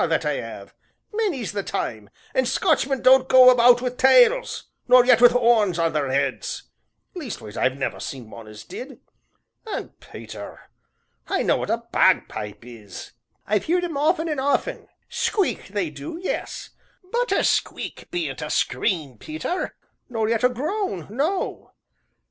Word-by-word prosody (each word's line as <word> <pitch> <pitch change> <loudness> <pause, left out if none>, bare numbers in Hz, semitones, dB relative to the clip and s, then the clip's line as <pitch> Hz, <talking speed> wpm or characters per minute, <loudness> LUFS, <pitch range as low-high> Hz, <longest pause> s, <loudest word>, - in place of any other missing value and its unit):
that - - 0
I - - 0
'ave, - - -9 0.4
many's 380 - -1
the 205 -1 -2
time, 110 - -4 0.2
an' 260 -1 +1
Scotchmen 275 -7 +1
don't 260 0 +6
go 255 -1 +8
about 245 0 +5
wi' 250 - +1
tails, 460 - +4 0.2
nor 250 0 +7
yet 245 -2 +5
wi' 245 - +10
'orns 230 -7 +3
on 165 -1 +1
their 145 -3 -1
'eads 135 +1 -2 0.5
leastways 235 - -7
I've 130 +1 0
never 135 - -3
seen 125 -5 -7
one 115 -2 -11
as 105 0 -11
did. 260 - -9 0.7
An', - - -4
Peter, - - -11 0.6
I - - 0
know - - +2
what - - -4
a 230 +1 -1
bagpipe 110 - +1
is; 115 -4 -11 0.3
I've 210 -1 0
heerd 355 +2 +1
'em 340 -4 -3
often 320 +3 +1
an' 300 -4 -2
often 285 - -1 0.2
squeak 400 -4 -1
they 195 -5 -3
do, 145 - -7
yes, 370 - -4 0.4
but - - 0
a - - +2
squeak - - -2
bean't 350 -1 -3
a - - -4
scream, 155 - -1
Peter, 315 +4 -4 0.3
nor 225 -3 -1
yet 230 +1 0
a 250 - +5
groan 290 - -3
no." 315 - -2
245 Hz, 155 wpm, -23 LUFS, -, 0.7 s, wi